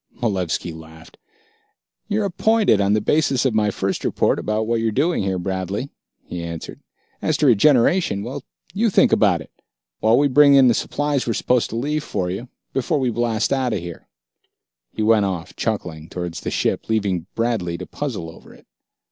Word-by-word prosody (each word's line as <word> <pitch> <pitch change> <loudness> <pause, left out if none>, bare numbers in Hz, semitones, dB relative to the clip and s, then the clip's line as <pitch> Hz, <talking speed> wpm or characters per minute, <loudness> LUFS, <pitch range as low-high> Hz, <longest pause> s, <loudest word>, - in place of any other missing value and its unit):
Malevski 90 -7 -1
laughed. 80 0 -14 0.9
"You're 205 0 0
appointed, 200 - +2
on 100 +1 +2
the 110 - +3
basis 135 0 +1
of 130 - +2
my 105 -1 +2
first 95 -1 -2
report - - +1
about 110 +1 -1
what 115 +1 0
you're 115 -1 0
doing 150 +10 +1
here, 95 -1 -1
Bradley," 95 +7 -3 0.3
he 90 - -6
answered. 85 -1 -7 0.4
"As 155 - 0
to 150 - +1
regeneration... 125 - +3
well, - - -6 0.3
you 220 +4 +2
think - - +4
about - - +3
it, - - -13 0.5
while 110 +2 +4
we 145 - +4
bring 140 +1 +6
in 135 -2 +7
the - - +4
supplies 145 +2 -1
we're 115 - +1
supposed 125 -2 +1
to - - -6
leave 145 +5 -1
for 90 -9 -2
you, 115 +7 -6 0.2
before 145 +3 0
we 130 -2 0
blast 115 0 0
out 130 -3 0
of 100 - -1
here." 85 -1 -9 0.8
He 110 - -3
went 110 -2 +4
off, 90 -3 -4
chuckling, 85 -8 -3
towards 90 -2 -5
his - - -3
ship, - - -1
leaving 100 -6 0
Bradley 110 -8 -1
to 90 - -7
puzzle 125 - -5
over - - -16
it. - - -21
110 Hz, 180 wpm, -21 LUFS, 95-135 Hz, 0.9 s, in